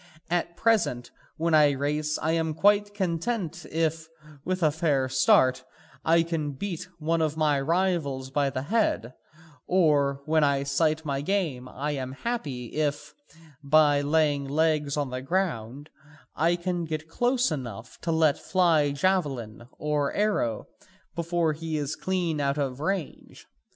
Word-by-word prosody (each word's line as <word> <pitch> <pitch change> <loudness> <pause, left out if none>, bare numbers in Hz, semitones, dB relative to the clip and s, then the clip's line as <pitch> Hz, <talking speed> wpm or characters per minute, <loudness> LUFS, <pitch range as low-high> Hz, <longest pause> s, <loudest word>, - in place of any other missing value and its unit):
At 170 -1 -1
present 215 - +1 0.3
when 165 +1 0
I 150 -2 +6
race 150 +2 -1
I 160 - -1
am 160 -1 0
quiet 205 +4 +3
content 175 -2 -2
if, 160 0 -1 0.4
with 185 -1 -2
a 155 - +4
fair 145 -4 +1
start, 130 0 +3 0.4
I 165 +1 +4
can 160 -4 -3
beat 180 +4 -5
one 165 +1 0
of 155 -1 0
my 150 -3 +2
rivals 155 -5 0
by 140 0 +1
the 130 -1 -4
head, 160 - 0 0.5
or 145 -6 +2
when 155 0 +3
I 140 -1 +2
sight 155 +3 0
my 140 -2 -1
game 150 -8 -2
I 145 +4 -3
am 130 -2 -4
happy 140 - -4
if, 145 -1 -1 0.5
by 145 0 +4
laying 145 -1 +1
legs 150 -1 +1
to 145 -1 0
the 130 -1 -5
ground, 140 - -2 0.4
I 165 +3 +2
can 175 0 -2
get 155 0 -4
close 245 +5 +1
enough 120 -6 -6
to 165 - -1
let 160 -3 +3
fly 165 -6 +2
javelin 140 - -1
or 150 -2 0
arrow 200 - 0 0.5
before 170 -1 0
he 160 0 -4
is 145 -1 -2
clean 175 -5 -1
out 140 +1 0
of 135 -3 -2
range. 180 +1 -4
155 Hz, 145 wpm, -26 LUFS, 140-170 Hz, 0.5 s, I